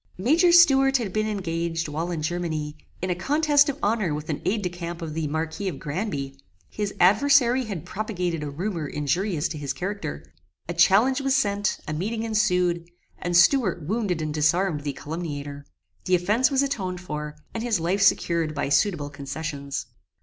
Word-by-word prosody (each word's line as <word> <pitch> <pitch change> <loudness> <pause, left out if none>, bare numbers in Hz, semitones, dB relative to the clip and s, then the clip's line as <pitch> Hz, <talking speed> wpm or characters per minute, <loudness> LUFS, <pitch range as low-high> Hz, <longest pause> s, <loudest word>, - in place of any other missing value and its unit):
Major 320 - +4
Stuart 270 -6 +6
had 215 -7 -4
been 215 0 0
engaged, 170 -5 -2
while 160 +4 -3
in 165 -3 -3
Germany, 155 -3 -2 0.3
in 185 - 0
a - - 0
contest 290 - +3
of 280 - -3
honor 205 -7 +1
with 150 +1 -4
an 145 - -4
Aid 210 +1 0
de 180 - 0
Camp 170 -1 -6
of 155 -2 -5
the 160 -1 -2
Marquis 160 +5 -3
of 185 - -3
Granby. 145 -5 -4 0.3
His 205 -1 -3
adversary 250 +6 +4
had 195 -8 -5
propagated 180 -6 -3
a 150 - -4
rumour 165 +1 -3
injurious 150 +4 -1
to 155 - -5
his 140 -2 -3
character. 180 - -5 0.4
A 175 - -3
challenge 205 +10 +4
was 270 -1 +1
sent; 205 -5 +1
a 155 - -2
meeting 220 +8 -2
ensued; 180 -6 +1 0.3
and 175 -1 +1
Stuart 185 - +4
wounded 185 -2 -1
and 155 -1 -3
disarmed 155 +2 +1
the 145 -1 -3
calumniator. 145 -2 -6 0.4
The 185 - +3
offence 210 +9 +2
was 275 -1 +2
atoned 190 -10 -2
for, 150 -4 -5 0.2
and 225 - -3
his 230 -5 0
life 180 +5 0
secured 170 -5 +2
by 145 - -1
suitable 145 0 +1
concessions. 140 0 -5
175 Hz, 175 wpm, -25 LUFS, 155-215 Hz, 0.4 s, Stuart